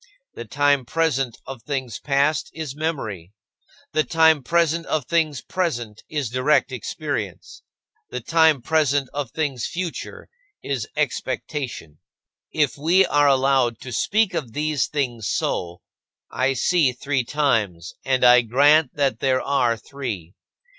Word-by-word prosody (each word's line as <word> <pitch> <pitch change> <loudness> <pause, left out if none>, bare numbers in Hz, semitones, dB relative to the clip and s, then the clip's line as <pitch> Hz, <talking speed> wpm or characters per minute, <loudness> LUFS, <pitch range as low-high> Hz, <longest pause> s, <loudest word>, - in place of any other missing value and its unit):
The - - -8
time 145 -1 +2
present 135 -3 -1
of 135 -3 -8
things 130 -6 -4
past 140 +1 +1
is 155 -4 -5
memory; 110 - -4 0.6
the 155 0 +2
time 160 -2 +4
present 165 +3 +1
of 155 -5 -1
things 155 -3 0
present 120 - -3
is 145 -7 -3
direct 135 +2 +2
experience; 125 -5 -5 0.5
the 125 - -4
time 160 0 +3
present 145 -3 +1
of 145 -4 -3
things 140 -6 -2
future 175 -1 -6 0.4
is 130 -6 -3
expectation. 120 - -3 0.5
If 145 -2 0
we 175 +6 +4
are 145 -3 +3
allowed 135 -3 +2
to 125 - -8
speak 210 - +1
of 120 -7 -4
these 150 -2 0
things 120 -8 -2
so, 85 0 -2 0.5
I 130 +1 +1
see 145 0 +2
three 135 +1 -1
times, 110 - -1
and 130 -1 +1
I 125 0 +8
grant 140 +5 +3
that 135 -6 0
there 130 -1 +1
are 125 -5 +1
three. 110 - -6
140 Hz, 135 wpm, -22 LUFS, 125-155 Hz, 0.6 s, I